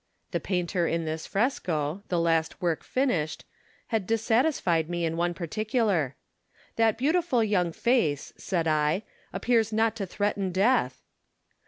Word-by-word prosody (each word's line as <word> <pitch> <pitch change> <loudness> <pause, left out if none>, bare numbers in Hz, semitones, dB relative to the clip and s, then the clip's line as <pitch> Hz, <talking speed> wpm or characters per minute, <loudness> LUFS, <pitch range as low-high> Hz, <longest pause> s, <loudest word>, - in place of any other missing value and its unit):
The - - 0
painter 180 -2 -1
in 165 0 -1
this 160 0 -4
fresco, 180 - -1
the 175 - 0
last 165 -1 +1
work 170 -3 -1
finished, 215 - -1 0.4
had 220 -5 -1
dissatisfied 225 - +1
me 175 -1 -1
in 165 0 -1
one 175 +1 0
particular. 200 - 0 0.3
" - - -32
That 225 -1 +3
beautiful 295 -2 +2
young 185 -5 +1
face," 165 - +1
said 170 -3 -2
I, 155 +5 +1 0.3
"appears 230 -3 +1
not 220 +1 +2
to 195 -4 -3
threaten 200 -1 -1
death." 185 - +2
185 Hz, 140 wpm, -27 LUFS, 165-225 Hz, 0.4 s, That